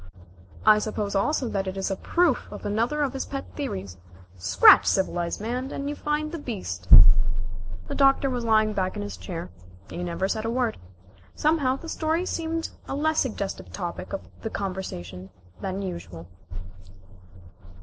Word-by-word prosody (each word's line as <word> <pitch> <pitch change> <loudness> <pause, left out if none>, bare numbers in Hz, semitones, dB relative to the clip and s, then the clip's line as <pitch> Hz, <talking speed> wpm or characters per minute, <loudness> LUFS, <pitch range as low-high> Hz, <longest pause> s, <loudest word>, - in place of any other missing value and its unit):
"I 210 - +7
suppose 210 -1 -3
also 250 +6 +1
that 195 -1 -2
it 190 +1 -4
is 195 +1 -1
a - - 0
proof 340 - +1
of - - -8
another 235 +9 +1
of 275 -2 -1
his 270 - -4
pet 275 -1 -4
theories. 95 - -4 0.4
Scratch 90 -1 +7
civilized 175 -2 0
man, 245 +5 -3
and 280 0 -4
you 295 - -2
find 300 +1 -1
the 335 - -5
beast." 140 - -5 1.0
The - - -4
Doctor 275 0 +4
was 250 -2 -2
lying 215 -1 +3
back 185 -2 -1
in - - -3
his 100 -2 -5
chair. 90 0 -6 0.4
He 175 - -4
never 175 +2 -1
said 215 +2 -2
a 225 - -1
word. 240 -2 0 0.6
Somehow 295 -4 +2
the 330 - -9
story 325 +2 0
seemed 330 -2 -2 0.2
a - - -3
less 315 +2 +1
suggestive 210 -6 -3
topic 180 -1 -5
of 195 - -3 0.3
conversation 95 - -5 0.3
than 195 0 -3
usual. 95 - -7
215 Hz, 160 wpm, -26 LUFS, 185-280 Hz, 1.0 s, I